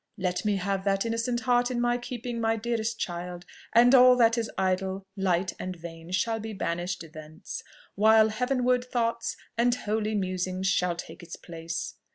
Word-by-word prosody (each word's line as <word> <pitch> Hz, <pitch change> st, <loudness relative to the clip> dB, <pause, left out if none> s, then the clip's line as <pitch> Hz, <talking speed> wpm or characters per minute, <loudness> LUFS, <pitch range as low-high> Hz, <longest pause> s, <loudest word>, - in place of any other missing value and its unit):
Let 180 Hz, -2 st, -1 dB
me 210 Hz, -1 st, +2 dB
have 195 Hz, 0 st, -1 dB
that 195 Hz, +1 st, +1 dB
innocent 230 Hz, +1 st, -1 dB
heart 245 Hz, 0 st, +2 dB
in 250 Hz, -1 st, -2 dB
my 240 Hz, 0 st, +1 dB
keeping, 240 Hz, -1 st, -5 dB
my 225 Hz, 0 st, +2 dB
dearest 225 Hz, 0 st, -2 dB
child, 175 Hz, -1 st, -5 dB, 0.3 s
and 245 Hz, +2 st, +6 dB
all 255 Hz, -1 st, +8 dB
that 230 Hz, -2 st, +4 dB
is 230 Hz, -2 st, -2 dB
idle, 190 Hz, 0 st, -1 dB
light, 185 Hz, -2 st, 0 dB
and 185 Hz, 0 st, -4 dB
vain 165 Hz, 0 st, -10 dB
shall 225 Hz, +5 st, 0 dB
be 220 Hz, 0 st, -6 dB
banished 175 Hz, -2 st, -3 dB
thence, 155 Hz, 0 st, -8 dB, 0.3 s
while 220 Hz, +1 st, +5 dB
heavenward 250 Hz, +2 st, +1 dB
thoughts 230 Hz, -2 st, -1 dB, 0.2 s
and 240 Hz, +1 st, +4 dB
holy 215 Hz, -1 st, -1 dB
musings 185 Hz, -1 st, -2 dB
shall 180 Hz, -2 st, +2 dB
take 175 Hz, -, -9 dB
its 170 Hz, -1 st, -8 dB
place. 165 Hz, -1 st, -6 dB
210 Hz, 170 wpm, -27 LUFS, 180-235 Hz, 0.3 s, all